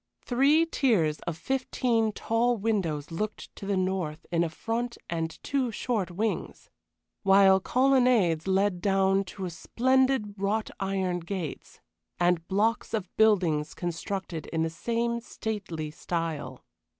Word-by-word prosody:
Three 280 +6 +4
tiers 215 - +1
of 165 -2 -2
fifteen 240 0 0
tall 230 +3 +1
windows 180 -9 -1
looked 210 +6 -4
to 195 - -8
the 200 -1 +1
north 185 -5 -2
in 170 0 +2
a 170 - -1
front 235 +7 -3
and 165 -1 -1
two 270 -3 0
short 215 -4 -1
wings, 210 +5 -3 0.5
while 195 -1 +6
colonnades 245 -9 +3
led 190 -1 +1
down 195 0 +3
to 185 0 -6
splendid 260 +2 +1
wrought 210 +2 0
iron 190 -2 -1
gates, 175 -2 -6 0.4
and 175 -1 +2
blocks 220 +4 +1
of 195 -5 -5
buildings 175 -9 +3
constructed 175 -1 -4
in 160 -1 -1
the 160 - -1
same 235 +6 -1
stately 195 -9 -5
style. 155 -6 -4
195 Hz, 125 wpm, -28 LUFS, 170-230 Hz, 0.5 s, while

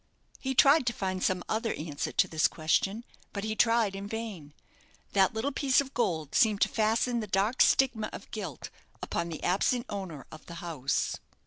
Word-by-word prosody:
He 265 0 -3
tried 275 0 +6
to 235 - +2
find 185 -3 -3
some 180 -1 0
other 225 +1 -1
answer 150 -2 -4
to - - +2
this 155 -1 +2
question; 195 +7 0 0.3
but 200 - -4
he 220 0 -2
tried 230 -3 +3
in 200 +1 -6
vain. 205 -10 -6 0.6
That 195 +3 +3
little 245 +6 -1
piece 270 -1 +2
of 275 -1 -2
gold 160 - -1
seemed 215 -3 +3
to - - +4
fasten 225 +2 +1
the 215 - -4
dark 200 +6 +1
stigma 230 -5 +3
of - - -10
guilt - - -6 0.3
upon 170 0 -2
the 160 - -7
absent 235 +7 +1
owner 190 -9 -6
of 155 - -11
the 170 - -8
house. 160 -6 -2
205 Hz, 185 wpm, -29 LUFS, 170-235 Hz, 0.6 s, tried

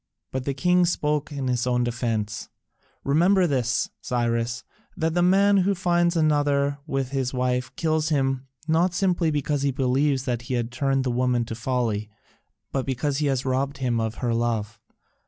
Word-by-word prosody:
But 130 -1 -3
the 140 - -1
king 180 +2 +3
spoke 150 -3 -1
in 140 -2 -3
his 125 -1 0
own 125 -1 +2
defence: 115 -3 -2 0.5
"Remember 180 +7 +4
this, 125 -5 0
Cyrus, 120 0 -1 0.3
that 160 -2 0
the 175 - +2
man 200 +3 +4
who 195 +1 +2
finds 175 -1 +1
another 145 -2 +2
with 135 -2 -2
his 130 -2 -1
wife 125 0 0
kills 155 -1 0
him 135 -3 0 0.2
not 170 +3 +2
simply 180 -3 +1
because 145 -1 -1
he 140 - +1
believes 135 +1 +1
that 120 -3 -1
he 125 +1 -3
has 120 -1 0
turned 135 +2 0
the 130 - -1
woman 125 -1 +1
to 115 - -6
folly, 115 -3 -1 0.6
but 135 - -1
because 135 +2 -1
he 150 - +1
has 135 -1 0
robbed 135 +2 -1
him 125 -3 0
of 110 0 -2
her 120 - +1
love. 115 -2 -1
135 Hz, 175 wpm, -25 LUFS, 125-155 Hz, 0.6 s, Remember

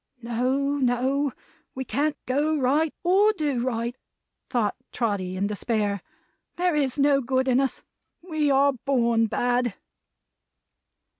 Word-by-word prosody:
"No, 260 +4 0
no. 260 +3 +1 0.4
We 265 0 -4
can't 295 +3 0
go 295 +4 +1
right 290 +4 +2
or 395 +5 +4
do 290 - -1
right," 235 -1 -2 0.5
thought 225 -5 0 0.2
Trotty 195 -6 -2
in 195 - 0
despair. 205 -1 -1 0.5
"There 355 0 +1
is 280 -3 0
no 280 -1 +4
good 260 +1 0
in 255 0 +3
us. 270 -1 -1 0.4
We 310 -4 0
are 280 +1 +4
born 235 -3 +1
bad!" 245 0 0
260 Hz, 125 wpm, -25 LUFS, 235-285 Hz, 0.5 s, or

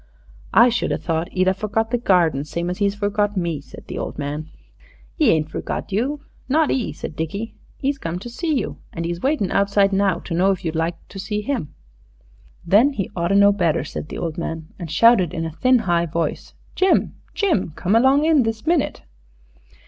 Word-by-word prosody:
"I 235 +2 +8
should 240 - -1
a - - +1
thought 165 0 -2
'e'd 185 0 +1
a 190 - +4
forgot 215 +3 -2
the 245 - +1
garden 170 - +2
same 170 +3 -3
as 180 - -6
'e's 200 0 +2
forgot 205 0 0
me," 170 -5 -1
said 140 - -13
the - - -6
old - - -5
man. 150 +2 -4 0.7
"'E 300 -7 +5
ain't 155 -3 +1
forgot - - -4
you, 265 +9 -1 0.3
not 310 +2 +3
'e," 250 -4 -1
said - - -7
Dickie; 200 +9 -4 0.3
"'e's 275 0 0
come 165 -4 -3
to 195 - -8
see 315 +8 -3
you, 265 -8 -1 0.2
an 165 -1 -4
'e's 170 +1 -3
waiting 270 -9 0
outside 200 0 +3
now 195 -2 +2
to 170 - -7
know 180 +3 +3
if 190 -3 -1
you'd 160 - -1
like 165 +1 0
to 195 - -9
see 210 +2 -3
'im." 250 - -3 0.9
"Then 230 +11 +4
'e 195 -3 -3
oughter 170 +2 +1
know 200 0 +6
better," 170 -8 +1
said 150 - -7
the - - -6
old 165 -1 -3
man, 160 -1 -5
and 170 -3 -6
shouted 185 0 +4
in 165 -1 -2
a 160 - -4
thin, 255 +10 +3
high 175 -6 +1
voice, 165 +1 -3 0.2
"Jim, 380 0 +2 0.2
Jim, 345 - +1
come 190 +5 0
along 265 +5 +4
in 315 -3 +5
this 225 0 -2
minute!" 330 -2 0
195 Hz, 200 wpm, -21 LUFS, 170-235 Hz, 0.9 s, I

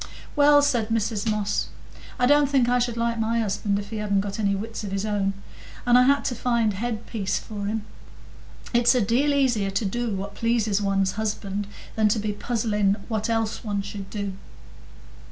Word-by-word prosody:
"Well," 290 -1 +6
said 235 -6 +1
Mrs 225 -1 0
Moss, 210 -1 0 0.5
"I 250 - +3
don't 290 +1 +4
think 265 -4 +3
I 245 0 +3
should 240 -1 -1
like 230 0 0
my 225 +1 0
husband 205 -1 0
if 200 0 -6
he 220 - -3
hadn't 200 -2 +1
got 200 +1 -5
any 200 -2 +1
wits 220 +3 -5
of 200 - -5
his 195 +1 -2
own, 200 -2 0 0.5
and 245 0 +5
I 250 - +8
had 280 +1 +3
to 255 - 0
find 235 -2 +1
head 225 +2 -3
piece 200 -4 -2
for 205 -2 -5
him. 215 +1 -2 0.9
It's 240 +2 +4
a 250 - +3
deal 245 +8 +2
easier 250 -8 +2
to 200 +3 -1
do 230 +2 -1
what 200 +1 -5
pleases 220 -2 +1
one's 195 -1 +1
husband, 205 -2 -3 0.3
than 220 -1 +3
to 210 - +2
be 210 0 -2
puzzling 210 -3 0
what 220 0 -1
else 225 -1 -1
one 205 -3 -2
should 200 -1 -7
do." 200 -2 -4
215 Hz, 190 wpm, -25 LUFS, 200-235 Hz, 0.9 s, I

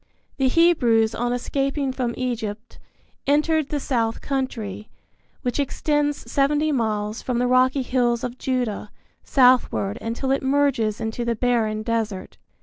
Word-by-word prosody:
The 270 -2 +2
Hebrews 245 -8 +3
on 240 +1 -1
escaping 275 +2 -1
from 250 -2 -2
Egypt 230 -3 -4 0.5
entered 305 +1 +2
the 295 - -1
South 230 -5 -1
Country, 230 -7 -4 0.5
which 250 +2 -1
extends 290 +1 -1
seventy 295 +2 +2
miles 215 -4 -1
from 250 -2 -2
the 245 - +1
rocky 255 +2 +3
hills 245 -2 +1
of 250 0 -5
Judah 245 -5 -2 0.3
southward 250 -5 +3
until 235 +4 -2
it 270 - +1
merges 265 -6 +1
into 225 +1 -3
the 235 0 0
barren 220 -2 0
desert. 220 -4 -3
250 Hz, 135 wpm, -23 LUFS, 225-275 Hz, 0.5 s, Hebrews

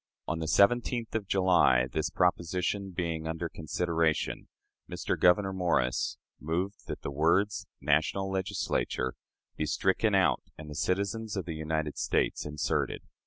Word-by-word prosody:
On 80 +1 -1
the 80 - -3
17th 120 - +3
of 110 -3 -2
July, 90 -11 +4
this 80 +5 -2
proposition 90 +2 0
being 85 -3 -3
under 80 +1 -2
consideration, 80 0 -1 0.4
Mr. - - -2
Gouverneur 95 +2 +4
Morris 85 -9 0 0.2
moved 90 +6 -3
that - - -6
the - - -3
words 85 +8 +1
"national 80 +7 +1
Legislature" 95 -8 -1 0.4
be 75 - -1
stricken 95 +6 +2
out, 95 -1 +3 0.2
and 75 -1 -8
"citizens 100 +6 -1
of 95 - -2
the 85 - -4
United 80 -1 -2
States" - - 0
inserted. 75 -1 -1
85 Hz, 130 wpm, -30 LUFS, 80-95 Hz, 0.4 s, July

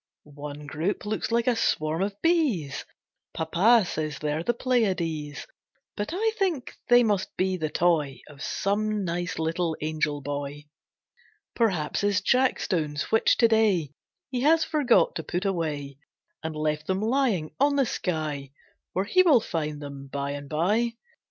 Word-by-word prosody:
One 145 0 -9
group 160 +9 -2
looks 215 +2 -2
like 235 0 +2
a 250 - +3
swarm 155 -5 0
of 200 +1 -2
bees, 275 - +1 0.5
Papa 190 +8 +4
says 155 -4 -3
they're 150 +2 -2
the 205 - +1
Pleiades; 170 - -1 0.5
But 205 - -3
I 435 +6 +1
think 345 -10 -1 0.2
they 245 0 +7
must 205 -4 -1
be 185 0 +1
the 160 -4 -2
toy 155 -5 +1
Of 145 -2 -13
some 210 +3 -1
nice 175 0 -2
little 160 0 -1
angel 150 -1 -1
boy. 145 +1 -4 0.9
Perhaps 185 -10 +1
his 205 -1 +2
jackstones 180 - +1
which 225 - +4
to 230 - +6
day 210 -9 +2 0.4
He 250 -2 -1
has 320 +4 +4
forgot 295 -6 +3
to 160 - -4
put 180 +5 -3
away, 150 -7 -2 0.4
And 160 -1 -4
left 150 0 -1
them 190 0 0
lying 225 - +1
on 285 0 +3
the 275 -2 +3
sky 155 - -3 0.4
Where 190 +2 0
he 370 - +4
will 320 -9 +6
find 150 -7 -3
them 140 -1 -8
bye 140 +1 -3
and 145 0 -6
bye. 210 +10 +1
175 Hz, 150 wpm, -26 LUFS, 150-225 Hz, 0.9 s, they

